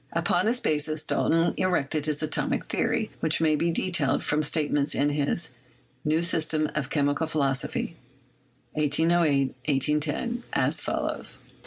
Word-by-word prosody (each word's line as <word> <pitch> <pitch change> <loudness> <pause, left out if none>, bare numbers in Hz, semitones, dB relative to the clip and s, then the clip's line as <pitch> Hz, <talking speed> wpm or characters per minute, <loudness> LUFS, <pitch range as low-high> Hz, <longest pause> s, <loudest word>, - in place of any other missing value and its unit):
Upon 175 +3 +1
this 245 +2 +2
basis 155 -2 0
Dalton 165 +1 +1
erected 155 -5 0
his 150 0 0
Atomic 155 - -1
Theory, 220 -2 -1
which 160 -1 +2
may 155 -1 +3
be 170 +3 0
detailed 170 -5 +1
from 150 +1 +1
statements 150 -1 0
in 145 +1 +2
his 145 +3 0 0.5
"New 155 +2 +1
System 155 -2 +2
of 145 -3 -3
Chemical 145 +1 0
Philosophy'' 135 -4 -1 0.8
(1808 150 -2 +2
1810), 150 - 0
as - - +2
follows: - - -1
1. - - -26
155 Hz, 135 wpm, -26 LUFS, 145-165 Hz, 0.8 s, may